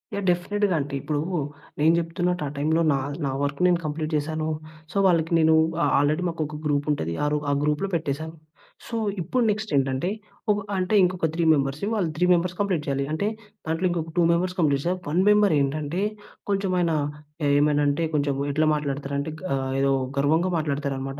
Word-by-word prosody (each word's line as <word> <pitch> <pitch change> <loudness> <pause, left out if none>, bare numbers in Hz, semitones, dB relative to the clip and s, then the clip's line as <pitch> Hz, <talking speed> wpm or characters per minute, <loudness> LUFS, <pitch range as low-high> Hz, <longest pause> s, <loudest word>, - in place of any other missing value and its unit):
Yeah! 200 - -2
డెఫినిట్‌గా. 190 +2 +1
అంటే, 140 0 -6
ఇప్పుడు 145 +1 -2 0.6
నేను 160 +2 +5
జెప్తున్నట్టు 175 0 -1
ఆ 140 - -3
టైంలో 160 +3 +1
నా - - +1 0.3
నా 135 - -1
వర్క్ 140 0 -2
నేను 175 -1 +3
కంప్లీట్ 155 +1 -3
చేశాను. 155 +1 -2 0.4
సో, - - -4
వాళ్ళకి 165 -2 +2
నేను 160 0 +5 0.3
ఆ - - +4
ఆల్రెడీ 155 +5 +1
మాకొక 155 -2 -4
గ్రూపుంటది. 145 - 0
ఆ - - +2
రో 150 - +2
ఆ - - +2
గ్రూప్‌లో 150 +6 0
పెట్టేశాను. 160 +1 -3 0.5
సో, 230 - -5 0.3
ఇప్పుడు 235 +9 0
నెక్స్టేంటంటే, 145 -8 0 0.4
ఒక 205 - +2 0.2
అంటే 185 +3 +1
ఇంకొక 180 -2 +1
త్రీ 170 +1 0
మెంబర్స్, 140 0 -1
వాళ్ళు 190 -7 0
త్రీ 180 +3 +2
మెంబర్స్ 175 +1 0
కంప్లీట్ 190 -6 0
చేయాలి. 140 0 0
అంటే, 160 +6 0 0.4
దాంట్లో 165 +3 0
ఇంకొక 165 -2 -3
టూ - - +5
మెంబర్స్ 180 +2 0
కంప్లీట్ 145 -4 +2
చే 175 - +2 0.2
వన్ 155 +5 +1
మెంబరేంటంటే, 155 -5 +2 0.5
కొంచెమాయనా 185 -4 +1 0.6
ఏమైనా 145 0 +3
అంటే, 145 +4 +1
కొంచెం 145 -1 +1 0.2
ఎట్లా 155 +2 +2
మాట్లాడతారంటే 140 0 -3
గా 185 -7 -1 0.3
ఏదో 135 - +3 0.3
గర్వంగా 160 +6 +2
మాట్లాడతారనమాట. 140 -2 -3
155 Hz, 165 wpm, -25 LUFS, 145-180 Hz, 0.6 s, నేను